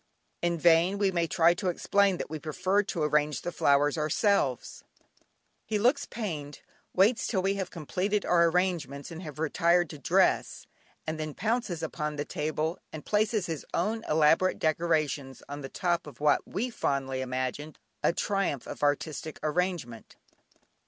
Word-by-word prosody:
In 170 0 0
vain 170 +4 +4
we 200 -1 +2
may 170 -2 0
try 165 +1 +4
to 185 +1 -2
explain 200 +2 +2
that - - -4
we 155 +1 -5
prefer 185 +6 +1
to 185 -5 -3
arrange 150 -2 +1
the 175 - -3
flowers 145 0 +2
ourselves, 155 - 0 0.8
he 215 - -1
looks 255 +7 +2
pained, 150 - -5 0.3
waits 210 +6 +3
till 190 -5 0
we 195 +1 +2
have 195 -2 -3
completed 185 +6 -2
our 170 -1 +4
arrangements 165 -5 -1
and 165 +1 -7
have 155 -5 -8
retired 170 +2 +2
to 150 - -9
dress, - - +1 0.4
and 155 0 -3
then 155 -1 -4
pounces 215 -6 -1
upon 150 -1 -3
the 145 0 -3
table 155 +3 -2
and 155 -2 -8
places 210 -1 +1
his 160 -4 -4
own 220 +6 -1
elaborate 160 +4 +4
decorations 155 -4 0
on 145 +1 -6
the 135 - -6
top 175 -3 -1
of 140 -5 -12
what 150 -1 +2
we 240 +6 -2
fondly 135 - -1
imagined 130 +4 -3 0.2
a - - +3
triumph 195 - -1
of - - -8
artistic 150 +1 -1
arrangement. 155 -7 -2
165 Hz, 160 wpm, -28 LUFS, 150-190 Hz, 0.8 s, vain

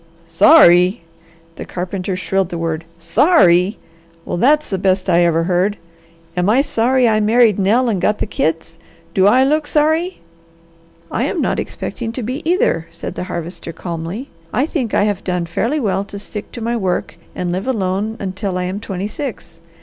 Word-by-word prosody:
"Sorry!" 180 - +5 0.5
the - - -5
carpenter 185 +1 -4
shrilled 185 0 -1
the 175 - -4
word. 165 -1 -3
"Sorry! 180 - +3 0.5
Well - - -3
that's 300 +9 +3
the 190 - -3
best 190 0 +1
I 175 +1 +4
ever 165 -1 +2
heard! 185 +4 +1 0.6
Am 180 +2 +1
I 245 +6 +4
sorry 255 -1 +2
I 215 -1 +3
married 220 -1 +3
Nell 225 +6 +2
and 205 -6 0
got 210 +3 +1
the - - -2
kids? 165 -3 -2 0.3
Do 190 0 +4
I 255 +5 +5
look 300 +2 +1
sorry?" 315 +4 +1 0.9
"I - - 0
am - - -2
not - - 0
expecting 230 -2 -5
to 250 - -4
be, 255 +7 -4
either," 165 - +1
said - - -7
the - - -5
Harvester 170 -1 -6
calmly. 170 - -6 0.2
"I 255 +6 +1
think 260 -8 -2
I - - +3
have 205 -2 -1
done 180 -2 -1
fairly 230 - -1
well 195 -6 0
to 200 - -8
stick 205 +1 -7
to 235 - -7
my 235 +1 -1
work 185 -6 -2 0.2
and 180 -1 -2
live 185 +6 -3
alone 210 -2 -1
until 190 0 -3
I 180 - -1
am 185 +3 -3
twenty 195 -2 -4
six. 280 +6 -7
200 Hz, 180 wpm, -18 LUFS, 180-240 Hz, 0.9 s, Sorry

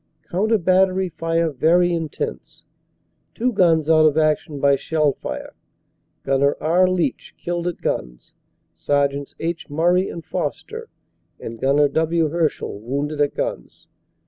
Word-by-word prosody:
Coun 195 +5 0
ter 225 - +4
battery 185 0 +2
fire 165 0 -1
very 170 +6 +3
intense; 155 - -5 0.7
two 250 +2 0
guns 165 -6 +3
out 155 -1 +5
of 150 0 +1
action 155 -1 +1
by 140 0 +4
shell 150 0 0
fire. - - -7 0.7
Gnr. 135 +1 +2
R. 175 +4 +3
Leitch 185 -2 -2
killed 175 0 -3
at 175 - -4
guns; - - -4 0.4
Sergts. 140 -1 -1
H. 165 0 -4
Murray 175 +5 +2
and 170 - -8
Foster 460 +1 -4 0.5
and 115 0 -8
Gnr. 140 +2 +2
W. 160 0 +1
Hershall 160 -10 -1
wounded 140 +6 -3
at 145 - +1
guns. - - -5
160 Hz, 135 wpm, -21 LUFS, 145-175 Hz, 0.7 s, out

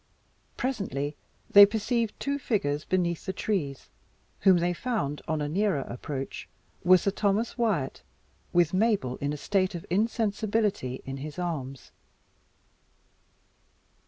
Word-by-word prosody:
Presently, 150 - -2 0.3
they 205 - +10
perceived 220 +2 +1
two 280 0 -1
figures 150 - -1
beneath 175 -1 -1
the 190 - -1
trees, 150 -13 -3 0.5
whom 190 -2 +6
they 175 +1 +1
found, 175 - -2
on 155 -2 -1
a - - -1
nearer 185 -1 +1
approach, 135 +2 -6 0.3
were 185 +1 +7
Sir 200 +3 0
Thomas 205 +3 0
Wyat, 210 - 0 0.5
with 175 -1 +3
Mabel 190 - +1
in 145 +1 -2
a 150 - -3
state 190 +4 0
of 170 - -6
insensibility 210 - 0
in 135 0 -5
his 150 +3 -7
arms. 140 -7 -4
185 Hz, 125 wpm, -28 LUFS, 145-210 Hz, 0.5 s, they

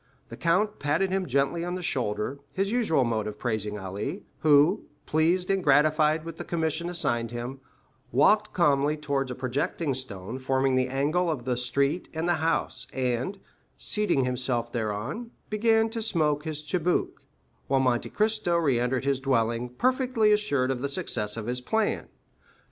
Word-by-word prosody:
The - - -7
count 190 +5 +1
patted 165 +6 +1
him 190 -1 0
gently 140 +5 +1
on 175 +1 -3
the 185 - -5
shoulder, 120 -1 -2
his 195 +1 0
usual 215 - +2
mode 110 -3 -1
of 105 0 -6
praising 105 -3 -2
Ali, 100 - -5 0.2
who, 155 +6 +4 0.2
pleased 170 +4 +2
and 195 -1 +1
gratified 155 +1 +3
with 165 - -7
the - - -5
commission 165 0 -1
assigned 120 -10 0
him, 120 +3 -5 0.5
walked 210 - +4
calmly 150 -3 +2
towards 140 -3 -1
a 125 - -4
projecting 135 +4 -1
stone 120 -2 -5
forming 130 0 +1
the 130 0 +2
angle 150 +7 +1
of 135 -7 -3
the 125 -1 0
street 140 +7 0
and 160 +2 -1
house, 165 -1 0
and, 130 +8 -1 0.4
seating 210 -11 +1
himself 125 -2 -1
thereon, 115 - -3 0.2
began 225 +1 +3
to 225 -1 -3
smoke 155 -8 +1
his 155 -1 -4
chibouque, 175 +2 -1 0.4
while 135 0 +2
Monte 125 -2 +1
Cristo 215 -5 +1
re 140 -8 +2
entered 125 +2 0
his 140 -1 +1
dwelling, 120 -2 0
perfectly 250 - +2
assured 145 -12 +2
of 125 -2 -3
the 140 - -1
success 115 - -2
of 110 - -4
his 125 +2 -2
plan. 220 - 0
140 Hz, 160 wpm, -27 LUFS, 125-175 Hz, 0.5 s, who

